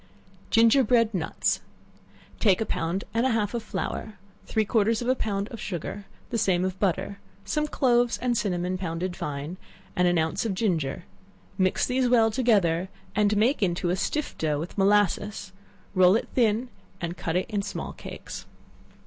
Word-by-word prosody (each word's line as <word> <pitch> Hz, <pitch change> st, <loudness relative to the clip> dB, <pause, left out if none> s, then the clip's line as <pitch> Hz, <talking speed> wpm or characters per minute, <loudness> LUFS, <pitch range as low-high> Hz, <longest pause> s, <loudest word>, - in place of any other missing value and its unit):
Ginger 230 Hz, +4 st, +5 dB
bread 230 Hz, -1 st, +3 dB
Nuts. 170 Hz, -4 st, 0 dB, 0.8 s
Take 195 Hz, -5 st, +4 dB
a 220 Hz, -, 0 dB
pound 170 Hz, +1 st, -2 dB
and 230 Hz, +1 st, +2 dB
a 260 Hz, -, +3 dB
half 210 Hz, -1 st, 0 dB
of 235 Hz, -, -1 dB
flour, 215 Hz, 0 st, -4 dB, 0.3 s
three 220 Hz, -1 st, +1 dB
quarters 220 Hz, 0 st, +2 dB
of -, -, -4 dB
a 255 Hz, -, +4 dB
pound 205 Hz, -5 st, -2 dB
of 230 Hz, -, -8 dB
sugar, 200 Hz, +2 st, -5 dB, 0.3 s
the 230 Hz, -, 0 dB
same 185 Hz, -2 st, +2 dB
of 185 Hz, 0 st, -3 dB
butter, 200 Hz, +1 st, -1 dB, 0.3 s
some 300 Hz, +8 st, 0 dB
cloves 245 Hz, -4 st, +2 dB
and 245 Hz, -1 st, 0 dB
cinnamon 185 Hz, -4 st, -1 dB
pounded 175 Hz, 0 st, -3 dB
fine, 145 Hz, +4 st, -5 dB, 0.4 s
and 180 Hz, 0 st, +3 dB
an 175 Hz, 0 st, +3 dB
ounce 160 Hz, 0 st, 0 dB
of 215 Hz, -4 st, -1 dB
ginger; 170 Hz, -6 st, -1 dB, 0.5 s
mix 185 Hz, -2 st, +2 dB
these 255 Hz, 0 st, +1 dB
well 225 Hz, -2 st, +4 dB
together, 195 Hz, -8 st, +2 dB, 0.3 s
and 210 Hz, 0 st, +3 dB
make 235 Hz, +6 st, +2 dB
it -, -, +5 dB
into 175 Hz, 0 st, -1 dB
a -, -, +2 dB
stiff 300 Hz, +10 st, -2 dB
dough, 150 Hz, -2 st, 0 dB
with 165 Hz, +4 st, -6 dB
molasses; 205 Hz, 0 st, +1 dB, 0.4 s
roll 185 Hz, 0 st, +6 dB
it 230 Hz, -, 0 dB
thin, 235 Hz, 0 st, +2 dB, 0.3 s
and 170 Hz, -1 st, -3 dB
cut 165 Hz, -2 st, -3 dB
it 180 Hz, -, +1 dB
in 210 Hz, -3 st, -1 dB
small 195 Hz, 0 st, -5 dB
cakes. -, -, -9 dB
205 Hz, 175 wpm, -26 LUFS, 180-230 Hz, 0.8 s, roll